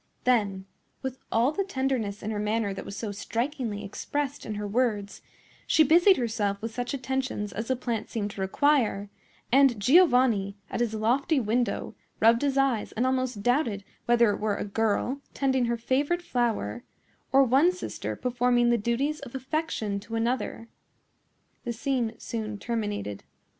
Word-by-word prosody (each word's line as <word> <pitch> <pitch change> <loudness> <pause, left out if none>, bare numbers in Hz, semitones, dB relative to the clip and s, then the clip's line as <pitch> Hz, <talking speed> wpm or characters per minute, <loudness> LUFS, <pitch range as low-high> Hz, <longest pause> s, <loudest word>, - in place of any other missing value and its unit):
Then, 205 -6 +1 0.4
with 265 -1 -4
all 235 +5 +3
the 395 +6 -1
tenderness 260 - -2
in 215 - -2
her 210 - -2
manner 210 -1 0
that 195 - -7
was 200 - -7
so 215 -1 -3
strikingly 230 +1 -3
expressed 285 +7 -4
in 215 - -3
her 205 0 -3
words, 205 -3 -1 0.5
she 315 - +5
busied 345 +6 +6
herself 215 -4 -1
with 225 +1 -5
such 245 +3 -3
attentions 260 -6 -3
as 220 +2 -4
the 260 - +1
plant 235 -3 -3
seemed 210 -3 -3
to 200 - -7
require; 210 -2 +1 0.4
and 265 -3 +5
Giovanni, 250 - +4
at - - -2
his 235 -2 0
lofty 255 +7 +2
window, 235 -1 -1 0.3
rubbed 230 +2 +5
his 280 -1 0
eyes 270 -6 +1
and 240 +3 0
almost 255 -5 -1
doubted 245 -5 +1 0.2
whether 235 -2 +5
it - - -3
were 210 -1 0
a - - -3
girl 225 +6 0
tending 265 -2 +2
her 235 0 0
favorite 285 +9 0
flower, 225 - -1 0.5
or 275 +1 +6
one 270 +8 +4
sister 365 - -5
performing 245 -1 +2
the 235 - +2
duties 270 +8 0
of 240 - -10
affection 260 -7 -2
to 215 +3 -7
another. 230 0 -1 1.0
The 240 - -3
scene 245 -2 -1
soon 215 -2 -4
terminated. 205 - -3
235 Hz, 160 wpm, -27 LUFS, 210-265 Hz, 1.0 s, busied